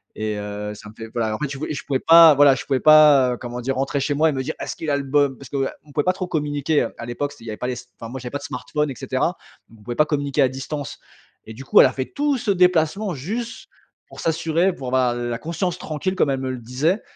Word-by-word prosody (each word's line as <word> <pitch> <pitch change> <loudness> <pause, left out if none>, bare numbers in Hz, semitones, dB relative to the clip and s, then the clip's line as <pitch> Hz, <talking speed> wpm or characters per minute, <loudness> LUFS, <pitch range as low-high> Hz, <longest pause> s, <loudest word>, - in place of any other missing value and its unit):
et 110 -1 -3
heu, 105 0 -5
ça 105 0 -12
me - - -14
fait 115 -1 -8
voilà, 110 -2 -1
en - - -4
fait, 150 - -1
je 135 - -6
voulais 155 - -4
je 140 - -6
pouvais 135 -2 0
pas, 165 -1 +8
voilà, 140 -1 +6
je - - -7
pouvais 135 -2 0
pas, 150 -4 +7
heu, - - -5
comment 120 0 -6
dire, 135 +2 -2
rentrer 135 +1 -1
chez 145 +2 0
moi 155 +3 +3
et - - 0
me 130 -1 -2
dire: 155 +4 -4
"Est-ce - - -4
qu'il 160 - -4
a 140 - +2
le 140 - -3
bo"» 145 +1 +2
parce 140 - -11
que, - - -7
heu, 135 0 0 0.2
on 145 - -17
pouvait 145 - +1
pas 185 - +4
trop 185 -1 -5
communiquer, 145 -2 0
heu. - - -5
À 115 - -7
l'époque, 140 +4 -3
c'était 145 - -17
il - - -11
y - - -4
avait 105 - -6
pas 125 - -4
les 130 - -1
s 120 0 -9
enfin, 115 - -7
moi, 130 +3 -6
j'avais 125 -1 -7
pas 145 - -3
de - - -13
smartphones 150 0 -3
et - - -7
cetera. - - -2 0.3
On 110 -2 -18
pouvait 120 +3 -5
pas 150 - +4
communiquer 145 -1 -1
à 130 - +4
distance, 135 +2 -6 0.5
et 110 - -9
du 135 +5 -10
coup, - - +5
elle - - +7
a 130 - -4
fait 130 - -3
tout 290 -1 0
ce 220 - -1
déplacement 180 +1 +2
juste 225 - -5 0.4
pour - - -13
s'assurer, 165 +3 +1
pour 135 -6 -8
avoir 125 -1 +2
l 120 0 -3
la 120 - -2
conscience 170 +4 -3
tranquille, 160 +5 -3
comme 170 - +2
elle 135 - -1
me 130 - -2
le 130 - -5
disait, 135 - -1
140 Hz, 300 wpm, -22 LUFS, 125-155 Hz, 0.5 s, pas